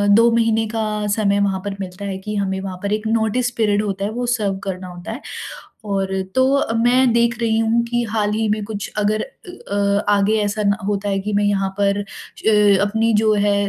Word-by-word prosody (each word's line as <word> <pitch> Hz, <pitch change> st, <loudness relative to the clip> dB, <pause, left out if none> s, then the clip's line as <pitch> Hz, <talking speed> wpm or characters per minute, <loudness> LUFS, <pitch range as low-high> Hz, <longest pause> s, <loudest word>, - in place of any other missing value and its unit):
2 230 Hz, +2 st, +6 dB
महीने 225 Hz, -1 st, +2 dB
का 215 Hz, -1 st, -1 dB
समय 200 Hz, -2 st, +2 dB
वहाँ 195 Hz, -1 st, +1 dB
पर 200 Hz, -1 st, -3 dB
मिलता 190 Hz, +1 st, -6 dB
है 190 Hz, -1 st, -3 dB
कि 210 Hz, +2 st, -5 dB
हमें 190 Hz, -1 st, -1 dB
वहाँ 190 Hz, -1 st, -5 dB
पर 200 Hz, +1 st, 0 dB
एक 215 Hz, +1 st, -2 dB
नोटिस 225 Hz, +2 st, +1 dB
पीरियड 210 Hz, -2 st, +2 dB
होता 195 Hz, -1 st, -2 dB
है, 210 Hz, -, -2 dB
वो 245 Hz, +2 st, -3 dB
सर्व 210 Hz, -5 st, 0 dB
करना 185 Hz, -1 st, -5 dB
होता 175 Hz, +3 st, -8 dB
है 245 Hz, -, -6 dB, 0.6 s
और 195 Hz, -2 st, -1 dB
तो 260 Hz, +1 st, +4 dB
अ, 225 Hz, -5 st, 0 dB
मैं 245 Hz, +2 st, +3 dB
देख 235 Hz, -1 st, +2 dB
रही 225 Hz, -1 st, +2 dB
हूँ 225 Hz, +1 st, +2 dB
कि 240 Hz, 0 st, -1 dB
हाल 210 Hz, -1 st, 0 dB
ही 220 Hz, +1 st, 0 dB
में 210 Hz, 0 st, 0 dB
कुछ 205 Hz, -1 st, -5 dB
अगर 210 Hz, +1 st, +1 dB
अ 360 Hz, -, -9 dB
अ, 200 Hz, 0 st, +1 dB
आगे 210 Hz, +2 st, +2 dB
ऐसा 205 Hz, +1 st, -1 dB
न 200 Hz, 0 st, +3 dB
होता 205 Hz, 0 st, -1 dB
है 195 Hz, 0 st, 0 dB
कि 205 Hz, +2 st, -3 dB
मैं 205 Hz, 0 st, +2 dB
यहाँ 195 Hz, -1 st, +1 dB
पर 200 Hz, 0 st, +2 dB
अ, 205 Hz, 0 st, +1 dB
अपनी 225 Hz, +2 st, +1 dB
जो 215 Hz, -, +4 dB
है 205 Hz, -1 st, +2 dB
210 Hz, 220 wpm, -20 LUFS, 200-225 Hz, 0.6 s, 2